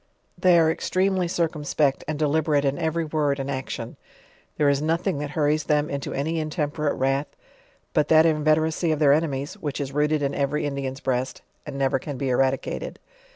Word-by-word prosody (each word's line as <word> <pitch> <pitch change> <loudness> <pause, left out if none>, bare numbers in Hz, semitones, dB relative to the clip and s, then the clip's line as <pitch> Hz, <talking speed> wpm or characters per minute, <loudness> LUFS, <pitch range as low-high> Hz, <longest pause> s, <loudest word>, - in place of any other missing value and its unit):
They 180 0 +4
are 160 -1 +4
extremely 185 +2 0
circumspect 155 -4 0
and 155 -1 -2
deliberate 150 -1 +1
in 135 0 0
every 165 +1 -1
word 150 -2 0
and 135 +1 -3
action; 130 -1 -5 0.6
there 150 - +3
is 140 0 +2
nothing 165 +1 0
that 145 -1 -3
hurries 150 0 +1
them 150 0 +1
into 140 -1 -4
any 160 +4 -1
intemperate 150 -1 -1
wrath, 135 +2 0 0.7
but 150 -2 +2
that 160 0 +6
inveteracy 160 +1 +2
of 155 - +1
their 145 -2 +5
enemies, 145 -2 -1
which 145 -1 -4
is 140 -2 -3
rooted 150 +1 +1
in 140 0 0
every 145 +2 -1
Indian's 140 -1 -4
breast, 130 0 -2 0.2
and 135 - -5
never 135 -1 +1
can 140 0 -6
be 135 0 -2
eradicated. 130 +1 -1
150 Hz, 175 wpm, -24 LUFS, 140-160 Hz, 0.7 s, that